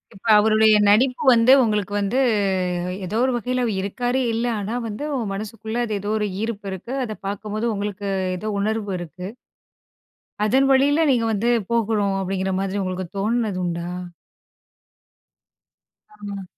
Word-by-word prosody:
இப்ப 195 - -11
அவருடைய 215 0 +5
நடிப்பு 250 +5 +3
வந்து 235 +1 +5
உங்களுக்கு 210 -4 0
வந்து 205 +6 0 0.9
எதோ 210 +5 -3
ஒரு 260 - +1
வகையில 250 +2 -1 0.2
இருக்காரு 245 +6 -1
இல்ல. 230 +2 -1
ஆனா 205 +2 -4
வந்து 215 +6 -5
உங்க 235 -5 -2
மனசுக்குள்ள 220 +2 -5
அது 220 - -4
எதோ 205 - -4
ஒரு 210 -1 0
ஈர்ப்பு 215 -3 -4
இருக்கு. 190 +7 -6
அத 220 - -5
பார்க்கும்போது 210 +2 -3
உங்களுக்கு 205 0 -4 0.3
எதோ 215 +4 -4
உணர்வு 215 0 -1
இருக்கு. 175 +1 -8 1.2
"அதன் 265 +6 +3
வழியில 285 +4 +4
நீங்க 240 -4 +2
வந்து 220 +3 0 0.2
போகணும்." 215 -4 +1
அப்படீங்கிற 190 0 -2
மாதிரி 195 +1 -2
உங்களுக்கு 185 0 -3
தோணுனது 215 -1 0
உண்டா? 170 0 -3 2.3
ஆமா. 200 -2 -7
215 Hz, 135 wpm, -22 LUFS, 200-230 Hz, 2.3 s, அவருடைய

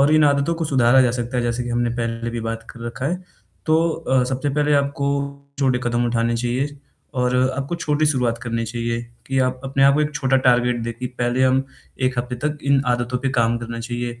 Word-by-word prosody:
और 140 +2 +5
इन 155 -1 +5
आदतों 140 +3 +2
को 165 0 -2
सुधारा 130 -3 +4
जा 125 - +3
सकता 120 +1 -3
है, 120 - +1
जैसे 120 +1 -1
कि - - -5
हमने 120 0 +1
पहले 115 0 -2
भी 120 0 -4
बात 115 0 -4
कर 120 - -13
रखा 125 +3 -4
है, 180 +3 -2 0.4
तो 160 +1 +3
अ, 130 -6 +1
सबसे 130 +3 -2
पहले 150 0 +2
आपको 140 0 +1 0.5
छोटे 130 -3 +2
कदम 120 0 +1
उठाने 115 0 +1
चाहिए 125 +5 -1 0.5
और 125 0 +2 0.2
आपको 140 +4 -2
छोटी 155 -2 +1
शुरुआत 125 -5 +1
करनी 115 -1 -2
चाहिए 115 +1 -2 0.3
कि 135 0 0
आप 130 0 +1
अपने 135 0 0
आप 140 - +6
को 150 - +2
एक 150 0 -1
छोटा 135 0 +2
टारगेट 125 -1 +3
दें 115 0 -3
कि 125 - -3
पहले 120 +1 +1
हम 130 +1 +3 0.4
1 130 -1 +1
हफ़्ते 125 +1 -2
तक 150 0 -3
इन 140 -1 +4
आदतों 125 0 0
पे 135 +2 -1
काम 120 -2 +2
करना 115 0 -6
चाहिए 120 0 -4
125 Hz, 225 wpm, -21 LUFS, 120-140 Hz, 0.5 s, आप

